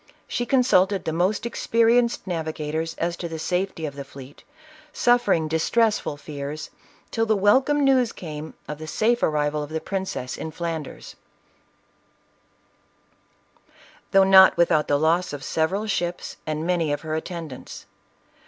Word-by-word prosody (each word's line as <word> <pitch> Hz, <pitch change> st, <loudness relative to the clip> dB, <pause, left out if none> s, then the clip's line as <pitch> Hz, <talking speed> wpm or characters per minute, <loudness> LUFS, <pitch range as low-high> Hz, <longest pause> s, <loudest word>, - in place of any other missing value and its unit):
She 240 Hz, -, -2 dB
consulted 205 Hz, -7 st, +3 dB
the 160 Hz, -, -1 dB
most 185 Hz, +7 st, 0 dB
experienced 235 Hz, 0 st, +2 dB
navi 160 Hz, -4 st, -3 dB
gators 160 Hz, +2 st, -3 dB
as 170 Hz, +1 st, -2 dB
to 170 Hz, -, -5 dB
the 165 Hz, -, -5 dB
safety 180 Hz, 0 st, -2 dB
of 145 Hz, -2 st, -6 dB
the 140 Hz, -, -6 dB
fleet, 135 Hz, 0 st, -13 dB, 0.5 s
suffering 240 Hz, -, +2 dB
distressful 165 Hz, +2 st, +1 dB
fears, 145 Hz, +1 st, -7 dB, 0.4 s
till 225 Hz, 0 st, 0 dB
the 215 Hz, -, +3 dB
welcome 260 Hz, +9 st, +3 dB
news 260 Hz, -4 st, +3 dB
came 155 Hz, -2 st, -8 dB
of 150 Hz, 0 st, -6 dB
the 155 Hz, -, -7 dB
safe 235 Hz, +8 st, +1 dB
arrival 150 Hz, 0 st, 0 dB
of 145 Hz, -, -6 dB
the 160 Hz, 0 st, -3 dB
princess 190 Hz, -9 st, -4 dB
in 160 Hz, -, -4 dB
Flanders, 165 Hz, -2 st, -6 dB, 2.9 s
though 195 Hz, 0 st, +5 dB
not 190 Hz, 0 st, +7 dB
without 165 Hz, -3 st, +3 dB
the 145 Hz, -, +2 dB
loss 165 Hz, +3 st, +1 dB
of 140 Hz, -2 st, -6 dB
several 185 Hz, +9 st, -1 dB
ships, 175 Hz, -4 st, -3 dB
and 155 Hz, +1 st, -2 dB
many 170 Hz, -4 st, 0 dB
of 145 Hz, -, -2 dB
her 155 Hz, -1 st, -5 dB
attendants. 160 Hz, -4 st, -6 dB
170 Hz, 145 wpm, -24 LUFS, 155-205 Hz, 2.9 s, not